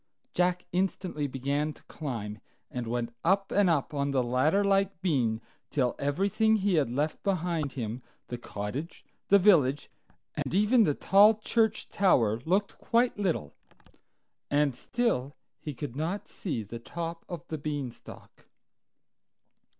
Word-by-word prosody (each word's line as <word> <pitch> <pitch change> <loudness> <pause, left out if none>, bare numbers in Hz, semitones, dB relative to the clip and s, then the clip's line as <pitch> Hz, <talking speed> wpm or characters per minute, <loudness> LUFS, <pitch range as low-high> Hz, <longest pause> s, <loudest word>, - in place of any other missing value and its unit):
Jack 180 0 +1
instantly 180 -4 -1
began 140 +3 -1
to - - -20
climb, 110 -8 -5 0.3
and 125 -2 -4
went 120 0 -2
up 195 +3 +2
and 200 -2 +4
up 155 -3 +1
on 140 -1 0
the 135 -2 +1
ladder 130 +11 +2
like 195 -2 +2
bean 125 -11 +1 0.3
till 125 -4 +1
everything 200 +10 +2
he 200 -2 +1
had 150 -7 +2
left 145 +6 -1
behind 170 -7 -1
him—the 120 0 -7
cottage, 120 - -6 0.2
the 200 - +7
village, 150 -9 +4 0.4
and - - -3
even 215 +3 +5
the 145 - +1
tall 205 +3 +6
church 220 0 0
tower—looked 165 - +2
quite 235 -2 +1
little, 170 - -1 1.0
and 145 -2 +2
still 145 - -1 0.2
he 150 - -5
could 145 -3 -6
not 165 +7 -3
see 140 - -4
the 115 +3 -8
top 165 +6 -5
of 175 -5 -7
the 155 - -3
Beanstalk. 145 -4 -7
155 Hz, 135 wpm, -29 LUFS, 130-195 Hz, 1.0 s, the